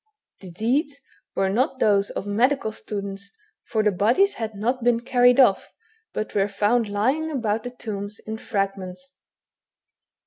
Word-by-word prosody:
The 190 Hz, -, -11 dB
deeds 270 Hz, -, -1 dB, 0.4 s
were 195 Hz, 0 st, +1 dB
not 260 Hz, +6 st, +1 dB
those 200 Hz, -4 st, +3 dB
of -, -, -5 dB
medical 230 Hz, +4 st, +1 dB
students, 200 Hz, -2 st, -6 dB, 0.4 s
for 220 Hz, -2 st, 0 dB
the 210 Hz, -, +3 dB
bodies 235 Hz, -, +3 dB
had 220 Hz, -2 st, -5 dB
not 240 Hz, +5 st, -1 dB
been 235 Hz, -1 st, +3 dB
carried 245 Hz, 0 st, +4 dB
oflf, 240 Hz, -8 st, +5 dB, 0.5 s
but 215 Hz, -, -4 dB
were 200 Hz, -1 st, +2 dB
found 210 Hz, +3 st, +1 dB
lying 260 Hz, +11 st, 0 dB
about 225 Hz, -7 st, -1 dB
the 245 Hz, -, -5 dB
tombs 210 Hz, -4 st, -6 dB
in 220 Hz, 0 st, -7 dB
fragments. 195 Hz, +4 st, -4 dB
220 Hz, 145 wpm, -24 LUFS, 200-250 Hz, 0.5 s, oflf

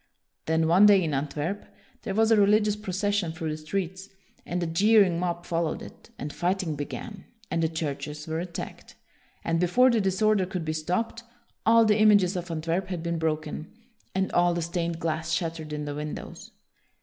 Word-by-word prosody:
Then, 160 Hz, 0 st, +2 dB
one 185 Hz, +5 st, +7 dB
day 200 Hz, -3 st, +6 dB
in 155 Hz, -3 st, -1 dB
Antwerp, 150 Hz, +7 st, -2 dB, 0.4 s
there 195 Hz, -4 st, -4 dB
was 225 Hz, +1 st, +3 dB
a -, -, +7 dB
religious 210 Hz, 0 st, +4 dB
procession 200 Hz, -3 st, -1 dB
through 160 Hz, -1 st, -3 dB
the 155 Hz, -, -4 dB
streets, 190 Hz, +4 st, -4 dB, 0.4 s
and 175 Hz, 0 st, -1 dB
a -, -, 0 dB
jeering 190 Hz, +1 st, +4 dB
mob 175 Hz, -1 st, -2 dB
followed 165 Hz, -2 st, -1 dB
it, -, -, -13 dB
and 145 Hz, +1 st, -5 dB
fighting 180 Hz, -3 st, -1 dB
began, 185 Hz, -, -7 dB, 0.3 s
and 165 Hz, -, 0 dB
the 160 Hz, -, +2 dB
churches 150 Hz, -1 st, -4 dB
were 160 Hz, 0 st, -2 dB
attacked, 175 Hz, 0 st, -7 dB, 0.5 s
and 165 Hz, 0 st, 0 dB
before 245 Hz, +9 st, +4 dB
the 230 Hz, -2 st, +2 dB
disorder 195 Hz, 0 st, +2 dB
could 180 Hz, -3 st, -4 dB
be 155 Hz, -, -1 dB
stopped 180 Hz, +9 st, -2 dB, 0.5 s
all 230 Hz, 0 st, +6 dB
the 215 Hz, 0 st, +3 dB
images 205 Hz, -3 st, +5 dB
of 175 Hz, -1 st, -4 dB
Antwerp 165 Hz, +3 st, -2 dB
had 180 Hz, -3 st, -4 dB
been 170 Hz, -1 st, -2 dB
broken, 155 Hz, -1 st, -3 dB, 0.4 s
and 190 Hz, 0 st, 0 dB
all 175 Hz, 0 st, +3 dB
the 170 Hz, -, -1 dB
stained 170 Hz, 0 st, -2 dB
glass 160 Hz, 0 st, -2 dB
shattered 160 Hz, -2 st, -3 dB
in 150 Hz, 0 st, -3 dB
the 145 Hz, -, -4 dB
windows. 150 Hz, +1 st, -7 dB
175 Hz, 180 wpm, -27 LUFS, 160-195 Hz, 0.5 s, one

